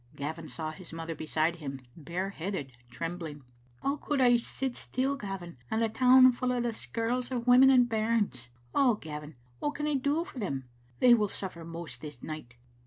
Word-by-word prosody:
Gavin 155 +3 -5
saw 155 +5 -4
his 170 +3 -11
mother 165 0 -4
beside 160 +2 0
him, 140 -4 -6 0.2
bare 175 +5 -3
headed, 175 -7 -4 0.2
trembling. 155 +3 -5 0.2
" 120 0 -31
How 280 +2 +1
could 295 -2 -1
I 245 -2 +6
sit 245 +2 -1
still, 265 +2 -1
Gavin, 195 - -6
and 220 - 0
the 225 -1 +2
town 255 +3 +7
full 250 +1 -1
o' 250 - 0
the 240 -1 0
skirls 240 +3 -2
of 245 -3 -2
women 255 +2 +8
and 250 -2 +6
bairns? 215 - 0 0.3
Oh, 255 -5 +4
Gavin, 150 -4 -8 0.2
what 295 - -1
can 295 - -2
I 300 - +1
do 285 +4 +1
for 350 -9 -9
them? 135 - -3 0.3
They 245 -1 +8
will 215 -3 +4
suffer 185 -4 -5
most 165 -7 -7
this 145 -5 -8
night." 155 -6 -7
195 Hz, 190 wpm, -30 LUFS, 155-250 Hz, 0.3 s, women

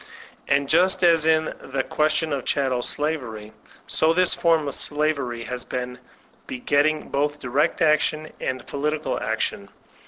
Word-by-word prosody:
And 140 0 +2
just 180 +5 +3
as 165 -2 +4
in 160 0 +2
the 135 0 -3
question 155 0 0
of 135 -3 -2
chattel 130 -3 0
slavery, 125 -9 -3 0.3
so 160 +1 +2
this 180 +1 +3
form 165 -3 +2
of 140 - -2
slavery 140 -6 0
has 125 0 -5
been 125 0 -5 0.5
begetting 145 +4 0
both 145 +1 -1
direct 145 +6 0
action 155 0 +1
and 130 -1 -3
political 150 +2 -2
action. - - -2
145 Hz, 135 wpm, -23 LUFS, 130-155 Hz, 0.5 s, as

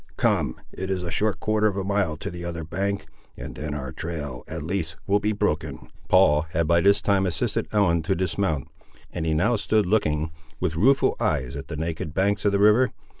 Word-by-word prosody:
Come, - - +1
it 95 0 -5
is 95 -2 -1
a 85 - -4
short 100 +1 0
quarter 110 0 +2
of 100 -2 -1
a 100 - -1
mile 95 -5 0
to - - -5
the 85 -1 -7
other 85 -1 -4
bank, 100 +5 -2 0.3
and - - -7
then 75 -1 -5
our 65 -3 -5
trail, 75 -6 -5
at - - -5
least, 85 -2 -2
will 100 +1 +3
be 105 +1 0
broken." 105 - -2 0.2
Paul 80 -4 +5
had 85 +1 +1
by 85 +1 +3
this 100 +2 +4
time 95 -2 +2
assisted 85 - -1
Ellen 95 -6 +3
to 90 +5 0
dismount, 90 -5 -1 0.5
and 80 - -2
he 80 - +1
now 110 +9 +2
stood 105 0 +2
looking, 80 -6 +1 0.3
with 85 -3 -1
rueful 135 +11 +4
eyes, 65 +1 0
at 70 - -6
the 75 - -5
naked 80 -1 -4
banks 100 +2 +1
of 100 - +4
the 100 - +2
river. 105 +5 +5
90 Hz, 210 wpm, -25 LUFS, 80-100 Hz, 0.5 s, Paul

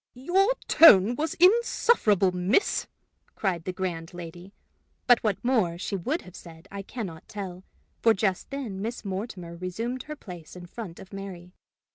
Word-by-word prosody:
"Your 375 - +2
tone 220 - +8
was 315 +5 -2
insufferable, 360 - +4
miss!" 180 - +1 0.5
cried 180 -5 -2
the 185 - -2
grand 175 -3 -4
lady; 175 +2 -9 0.5
but 245 -2 +5
what 210 -4 +1
more 215 -10 +2
she 200 +3 -3
would 265 - -2
have 180 - -14
said 165 +1 -13
I 200 0 -5
can 225 +3 -6
not 165 -3 -10
tell, 190 -3 -7 0.4
for 225 -1 +5
just 190 -2 -1
then 245 -9 -5
Miss 225 +1 -5
Mortimer 190 -3 -5
resumed 225 +9 -4
her 300 - -4
place 180 - -11
in 180 -1 -9
front 180 -2 -8
of 190 - -13
Mary. 185 -3 -8
195 Hz, 160 wpm, -27 LUFS, 180-240 Hz, 0.5 s, tone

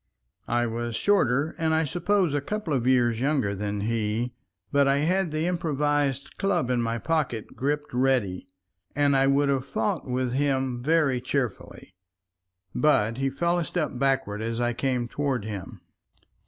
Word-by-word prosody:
I 120 0 +1
was 120 0 -3
shorter 155 -6 +2
and 160 -1 +2
I 160 - +2
suppose 175 +2 +1
a 145 - 0
couple 205 0 -3
of 125 -2 0
years 120 -3 +3
younger 135 -7 +1
than 100 0 -3
he, 115 +2 -1 0.4
but 140 -1 +4
I 135 - +4
had 180 +3 +1
the 155 +1 -1
improvised 145 -5 -1
club 195 -11 +1
in 125 -1 +1
my 115 0 -1
pocket 135 -5 -2
gripped 145 +1 -2
ready, 125 -9 +1 0.5
and 145 -1 +3
I 135 0 +4
would 140 +1 +3
have 135 -2 +1
fought 110 -2 -2
with 125 -1 -1
him 130 -3 0
very 145 -3 +2
cheerfully. 125 -7 -4 0.8
But 115 -6 +2
he 135 0 +1
fell 170 +6 0
a - - 0
step 160 -2 -2
backward 135 -6 0
as 115 +1 -3
I 120 0 +1
came 125 -1 -1
toward 135 -4 -2
him. 105 -4 -7
135 Hz, 160 wpm, -26 LUFS, 120-150 Hz, 0.8 s, but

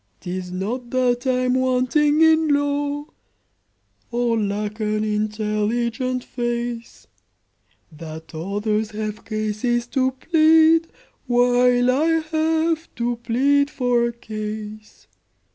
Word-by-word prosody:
"'Tis 180 0 -5
not 230 +7 -4
that 250 0 0
I'm 255 -1 +1
wanting 260 +4 +2
in 320 0 +4
law, 285 0 0 1.0
Or 240 -1 0
lack 210 0 -2
an 215 0 -1
intelligent 215 +4 -1
face, 240 -1 -4 0.9
That 160 +1 -10
others 205 +6 -2
have 215 0 -5
cases 215 +2 -1
to 260 -1 +1
plead, 320 +2 +4 0.4
While 245 0 +3
I 310 +5 +2 0.2
have 320 +1 0
to 240 0 -1
plead 275 +5 +2
for 245 -4 +1
a - - -3
case. 215 - -8
240 Hz, 100 wpm, -22 LUFS, 215-270 Hz, 1.0 s, in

